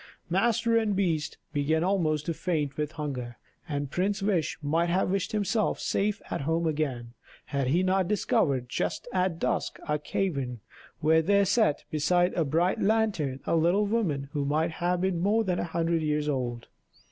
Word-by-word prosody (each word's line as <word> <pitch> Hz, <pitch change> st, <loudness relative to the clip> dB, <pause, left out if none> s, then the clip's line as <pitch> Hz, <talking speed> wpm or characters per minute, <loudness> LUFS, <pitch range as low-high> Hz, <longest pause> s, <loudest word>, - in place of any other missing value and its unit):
Master 230 Hz, +4 st, +2 dB
and 215 Hz, -3 st, +1 dB
beast 165 Hz, -5 st, 0 dB, 0.2 s
began 155 Hz, +2 st, +1 dB
almost 160 Hz, -6 st, +1 dB
to 165 Hz, -, -1 dB
faint 150 Hz, -5 st, -2 dB
with 150 Hz, 0 st, -3 dB
hunger; 125 Hz, -6 st, -5 dB, 0.3 s
and 145 Hz, -2 st, -3 dB
Prince 195 Hz, +2 st, 0 dB
Wish 190 Hz, -6 st, 0 dB
might 165 Hz, +4 st, +1 dB
have 185 Hz, +1 st, +1 dB
wished 195 Hz, -1 st, -1 dB
himself 215 Hz, +1 st, 0 dB
safe 205 Hz, +1 st, -1 dB
at -, -, -2 dB
home 165 Hz, +4 st, 0 dB
again, 135 Hz, -7 st, -2 dB, 0.3 s
had 140 Hz, -2 st, -1 dB
he 170 Hz, +8 st, +2 dB
not 185 Hz, -1 st, +2 dB
discovered, 140 Hz, -10 st, +1 dB
just 125 Hz, -, -2 dB
at 185 Hz, -2 st, +1 dB
dusk, -, -, -1 dB
a 150 Hz, 0 st, 0 dB
cavern, 140 Hz, -8 st, -2 dB, 0.4 s
where 160 Hz, +1 st, +4 dB
there 200 Hz, +4 st, +3 dB
sat, 200 Hz, -5 st, +2 dB
beside 175 Hz, +4 st, +2 dB
a 170 Hz, -, +1 dB
bright 165 Hz, +6 st, +1 dB
lantern, 200 Hz, -11 st, +1 dB
a -, -, +1 dB
little 175 Hz, +6 st, +3 dB
woman 185 Hz, -11 st, 0 dB
who 145 Hz, -, -1 dB
might 155 Hz, +4 st, +1 dB
have 175 Hz, +2 st, -1 dB
been 190 Hz, -2 st, 0 dB
more 210 Hz, +5 st, +2 dB
than 180 Hz, -3 st, -1 dB
a -, -, -1 dB
hundred 165 Hz, 0 st, 0 dB
years 150 Hz, -1 st, 0 dB
old. 125 Hz, -4 st, -2 dB
165 Hz, 170 wpm, -28 LUFS, 150-195 Hz, 0.4 s, where